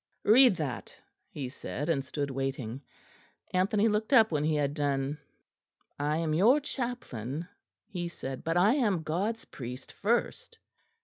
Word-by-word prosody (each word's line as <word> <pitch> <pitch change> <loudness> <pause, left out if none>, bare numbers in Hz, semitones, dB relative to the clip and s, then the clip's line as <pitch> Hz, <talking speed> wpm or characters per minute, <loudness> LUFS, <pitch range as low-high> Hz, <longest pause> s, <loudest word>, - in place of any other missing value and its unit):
"Read 240 0 +7
that," 145 -7 -5 0.3
he 140 -3 -5
said; 140 +3 -5
and 150 -5 +1
stood 140 +1 -3
waiting. 135 -2 -3 0.7
Anthony 200 +4 +3
looked 215 +2 0
up 225 -6 +6
when 150 -2 0
he 155 0 +1
had 145 -1 0
done. 145 0 -1 0.8
"I 150 +2 0
am 160 -2 0
your 225 - +5
chaplain," 175 - -4 0.4
he 180 -5 -4
said, 135 -6 -6
"but 165 +1 0
I 200 +6 +5
am 210 - +1
God's 195 +9 -2
priest 125 0 -8
first." 235 - -1
160 Hz, 140 wpm, -30 LUFS, 140-210 Hz, 0.8 s, Read